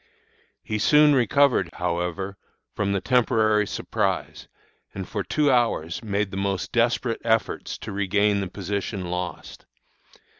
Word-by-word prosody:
"He 105 0 -3
soon 150 +6 +5
recovered, 130 - +3
however, 90 +2 -3 0.4
from 100 -1 -1
the 100 -1 0
temporary 110 -3 +2
surprise, - - -2 0.5
and 95 -1 -5
for 100 -3 -3
two 140 - +1
hours 115 -9 0
made 100 -2 -2
most 95 -1 -2
desperate 120 0 +1
efforts 110 -1 0
to - - -7
regain 100 +1 +1
the 95 - -2
position 100 -1 -4
lost. 90 -2 -6
100 Hz, 120 wpm, -24 LUFS, 95-115 Hz, 0.5 s, soon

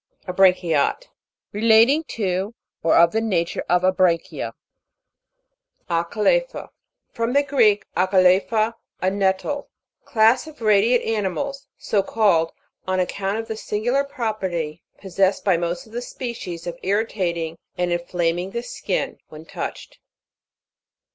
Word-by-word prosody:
ABRAN'CHIATE. 180 - +2 0.4
Relating 225 +8 +4
to, 195 -1 -2 0.3
or 165 - +3
of 170 0 +6
the 225 - 0
nature 180 -7 -1
of 180 +1 +3
abranchia. 185 -2 +1 1.4
ACALE'PHA. 215 - 0 0.4
From 230 +1 -2
the 285 +1 +4
Greek, 235 -8 +3
akale 185 0 +4
phe, 225 0 +1 0.2
a 185 - +1
nettte. 200 +9 -1 0.4
Class 240 +1 +3
of 310 -1 -12
radiate 220 +2 +3
animals, 275 +7 -2
so 205 - 0
called, 190 -7 +2 0.4
on 185 0 0
account 195 +2 -1
of 225 0 -4
the 220 - -4
singular 245 +6 0
property 190 - -3 0.2
possessed 190 0 0
by 190 -3 +4
most 170 +1 -2
of 220 - -18
the 240 - -3
species, 235 -9 -6
of 175 -1 -6
irritating 180 -5 -1 0.2
and 180 0 0
inflaming 175 +1 -1
the 235 +4 -4
skin, - - -3
when 155 +1 -11
touched. - - -7
195 Hz, 120 wpm, -22 LUFS, 175-230 Hz, 1.4 s, of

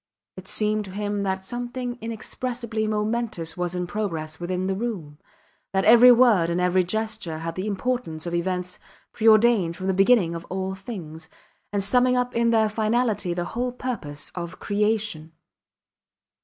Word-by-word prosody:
It 185 0 -11
seemed 215 0 0
to 190 - -9
him 205 0 -2
that 190 -1 -2
something 245 +2 -5
inexpressibly 230 0 -3
momentous 210 -6 -2
was 180 0 -2
in 180 0 -1
progress 165 -6 -4
within 180 +1 -2
the 190 - 0
room, 190 -9 -5 0.5
that 190 0 +1
every 240 +2 +9
word 230 -9 +5
and 170 +1 0
every 180 +1 +3
gesture 215 -3 -3
had 165 +1 -4
the 185 +4 -4
importance 205 -6 -2
of 170 - -4
events 180 +1 -2 0.3
preordained 220 -6 +4
from 185 - -6
the 190 - +1
beginning 195 -2 +4
of 170 0 -5
all 190 +1 -3
things, 175 -6 -8 0.4
and 200 -1 0
summing 250 +4 +3
up 250 0 0
in 235 0 +3
their 220 -1 +4
finality 215 -3 0
the 175 0 -2
whole 245 +6 -2
purpose 235 - -5
of 175 0 -6
creation. 210 -6 -1
205 Hz, 155 wpm, -24 LUFS, 175-230 Hz, 0.5 s, every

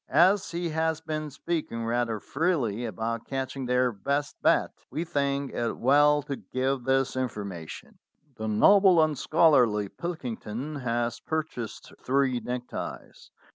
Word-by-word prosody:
As 180 +7 +4
he 170 0 -2
has 160 0 0
been 155 -1 -4
speaking 145 -6 -3
rather 115 -1 0
freely 125 - -1
about 115 +2 -3
catching 135 -1 -3
their 125 0 +2
best 140 +8 -2
bat, - - +3 0.2
we 160 - -2
think 140 -3 -1
it 120 -1 -2
well 145 +3 +4
to 140 -2 -4
give 130 -1 -2
this 135 -1 +1
information. 100 -10 -5 0.4
"The 110 -1 -4
noble 185 - +6
and 155 -1 +1
scholarly 125 - +3
Pilkington 135 - -5
has 120 -2 -1
purchased 155 -8 -5
three 130 -1 +2
neckties. 125 0 -6
135 Hz, 130 wpm, -27 LUFS, 120-155 Hz, 0.4 s, noble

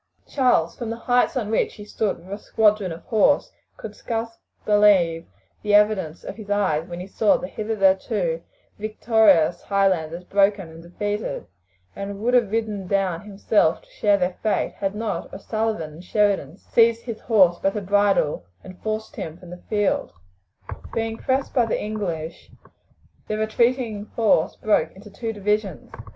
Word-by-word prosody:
Charles, 250 - +2
from 235 -3 -5
the 225 - -3
heights 245 +2 +1
on 220 -4 -2
which 225 - 0
he 205 - -10
stood 210 0 -2
with 190 +3 -10
a 205 - -5
squadron 210 -4 +2
of 165 - -8
horse, 225 +6 +2 0.3
could - - -8
scarce 230 -1 -4 0.3
believe 190 -6 +4 0.3
the 210 -1 +2
evidence 205 -6 +2
of - - -7
his 210 -3 -10
eyes 185 -6 +1
when 175 -1 -7
he 180 - -6
saw 205 +1 +2
the - - -6
hitherto 195 -4 0 0.4
victorious 215 -6 +3
Highlanders 180 -4 0
broken 195 -1 +1
and 160 +1 -12
defeated, 205 +5 -4 0.5
and 200 0 -6
would 240 +4 0
have 240 -5 +4
ridden 215 -3 -2
down 190 -3 0
himself 205 -4 +1
to - - -24
share 205 -1 +2
their 180 -1 -2
fate 215 - 0
had 195 0 -2
not 220 0 -3
O'Sullivan 215 -9 -3
and 165 +4 -12
Sheridan 195 -6 0
seized 230 +2 +2
his 230 -3 -6
horse 185 -7 +4
by 195 - +2
the 210 - -4
bridle 195 - +1 0.2
and 185 -1 -12
forced 220 0 -4
him 160 +1 -6
from 180 -1 -13
the 180 - -10
field. 205 -2 0 0.8
Being 225 0 -2
pressed 265 +2 -1
by 245 -4 +3
the - - -1
English, 180 -7 -5 0.8
the 215 - -2
retreating 220 -1 0
force 210 -8 +2
broke 215 - +1
into 205 +2 -14
two 225 +3 -4
divisions. 210 -3 -2
205 Hz, 160 wpm, -23 LUFS, 185-220 Hz, 0.8 s, believe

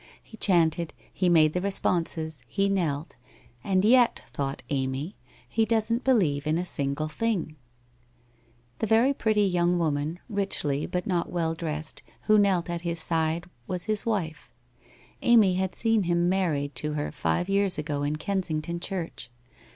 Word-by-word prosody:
He - - -13
chanted, 170 -5 +2 0.2
he 185 -1 +1
made 155 -3 +5
the 180 - -1
responses, 165 -6 0
he 195 +8 0
knelt 165 -6 -1 0.2
— 115 - -27
' 120 0 -33
and 190 0 +2
yet,' 245 +1 +4
thought 140 0 -3
Amy, 135 +6 -2 0.2
' - - -25
he 225 - +1
doesn't 225 +2 0
believe 165 - +2
in 155 +1 +2
a 180 - -2
single 140 -2 -1
thing! 175 -3 -2 0.6
' 120 0 -36
The 220 - 0
very 230 +6 +4
pretty 215 -5 +1
young 180 -2 +2
woman, 155 0 -1
richly 195 - -1
but 180 0 -2
not 175 -3 -1
well 165 -2 0
dressed, 155 -1 -5 0.2
who 215 -1 +5
knelt 190 -4 +2
at 170 -1 -3
his 170 -1 -2
side 165 +1 0 0.2
was 180 -2 -3
his 215 +1 -1
wife; 180 -10 -3 0.7
Amy 220 -6 +5
had 185 -1 -1
seen 225 -2 +2
him 175 -1 +1
married 160 -7 0
to 150 0 -1
her 150 0 -2
five 175 - -1
years 195 -2 +2
ago 150 -1 -2
in 145 +1 -1
Kensington 170 -1 -2
church. 170 -8 -5
170 Hz, 165 wpm, -27 LUFS, 155-195 Hz, 0.7 s, made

